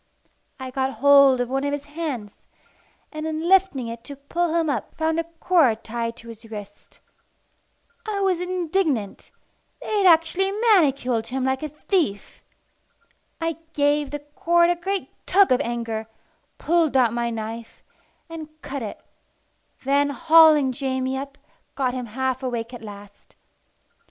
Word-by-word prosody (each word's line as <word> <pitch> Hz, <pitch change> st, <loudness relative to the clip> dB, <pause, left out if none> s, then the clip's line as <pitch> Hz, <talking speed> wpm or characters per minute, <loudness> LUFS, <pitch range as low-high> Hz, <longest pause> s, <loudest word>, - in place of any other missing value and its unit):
I 260 Hz, 0 st, -6 dB
got 265 Hz, 0 st, -1 dB
hold 275 Hz, +1 st, +6 dB
of 245 Hz, -, -1 dB
one 270 Hz, +2 st, -2 dB
of 285 Hz, 0 st, -1 dB
his 290 Hz, 0 st, -4 dB
hands, 290 Hz, -9 st, -5 dB, 0.8 s
and 310 Hz, 0 st, -5 dB
in 315 Hz, +1 st, -3 dB
lifting 375 Hz, -9 st, +3 dB
it 230 Hz, 0 st, -7 dB
to 285 Hz, -, -8 dB
pull 330 Hz, +5 st, -2 dB
him 330 Hz, -1 st, +1 dB
up 255 Hz, -8 st, -3 dB
found 320 Hz, 0 st, 0 dB
a 330 Hz, -, -1 dB
cord 325 Hz, -8 st, +2 dB
tied 230 Hz, 0 st, -4 dB
to 230 Hz, -, -12 dB
his 225 Hz, 0 st, -12 dB
wrist. 205 Hz, -2 st, -10 dB, 1.1 s
I 415 Hz, -2 st, -2 dB
was 375 Hz, -3 st, +1 dB
indignant: 350 Hz, -, -1 dB, 0.5 s
they 425 Hz, -, -2 dB
had 385 Hz, -, +4 dB
actually 350 Hz, +3 st, +4 dB
manacled 280 Hz, -, +2 dB
him 260 Hz, +2 st, -3 dB
like 265 Hz, 0 st, 0 dB
a 305 Hz, -, -4 dB
thief! 300 Hz, -, -2 dB, 1.0 s
I 330 Hz, -1 st, -2 dB, 0.2 s
gave 290 Hz, -1 st, +1 dB
the 290 Hz, -, -4 dB, 0.2 s
cord 345 Hz, +1 st, +3 dB
a -, -, +1 dB
great 380 Hz, +3 st, -3 dB, 0.2 s
tug 390 Hz, -2 st, +4 dB
of 255 Hz, +2 st, +4 dB
anger, 230 Hz, -3 st, -3 dB, 0.5 s
pulled 325 Hz, -4 st, +2 dB
out 240 Hz, -3 st, +3 dB
my 235 Hz, 0 st, -1 dB
knife, 225 Hz, 0 st, -7 dB, 0.4 s
and 325 Hz, -2 st, -8 dB
cut 275 Hz, 0 st, -5 dB
it; 215 Hz, -, -7 dB, 0.8 s
then, 285 Hz, +1 st, +2 dB
hauling 315 Hz, -2 st, +5 dB
Jamie 260 Hz, 0 st, -2 dB
up, 275 Hz, +1 st, -6 dB, 0.4 s
got 255 Hz, -3 st, 0 dB
him 250 Hz, -2 st, -4 dB
half 260 Hz, +3 st, -2 dB
awake 240 Hz, -2 st, -4 dB
at 245 Hz, -, -8 dB
last. 205 Hz, -2 st, -12 dB
280 Hz, 150 wpm, -23 LUFS, 240-330 Hz, 1.1 s, hold